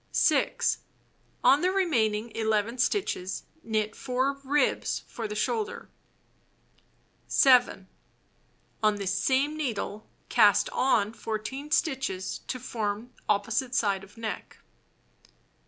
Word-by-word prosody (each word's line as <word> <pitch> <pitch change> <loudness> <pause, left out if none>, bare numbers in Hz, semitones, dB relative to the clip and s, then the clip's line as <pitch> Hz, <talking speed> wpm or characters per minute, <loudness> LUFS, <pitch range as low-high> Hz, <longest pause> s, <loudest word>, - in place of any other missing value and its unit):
6. - - +2 0.6
On 280 - +6
the 365 - +2
remaining 235 - +1
11 220 +2 0
stitches 200 - -1 0.2
knit 215 -3 -1
4 260 +2 -1
ribs 285 +2 +1
for 225 -2 -5
the 210 - -6
shoulder. 430 - -2 1.4
7. 250 -7 +4 0.9
On 215 -1 +3
this 195 -2 -2
same 270 +9 +1
needle 220 -7 -4 0.2
cast 210 -4 +4
on 225 -5 +2
14 230 +7 -5
stitches 265 - -1
to 255 - -3
form 220 +1 -3 0.2
opposite 225 +5 0
side 200 -4 +1
of 200 +3 -16
neck. 220 -4 -6
225 Hz, 105 wpm, -28 LUFS, 210-265 Hz, 1.4 s, On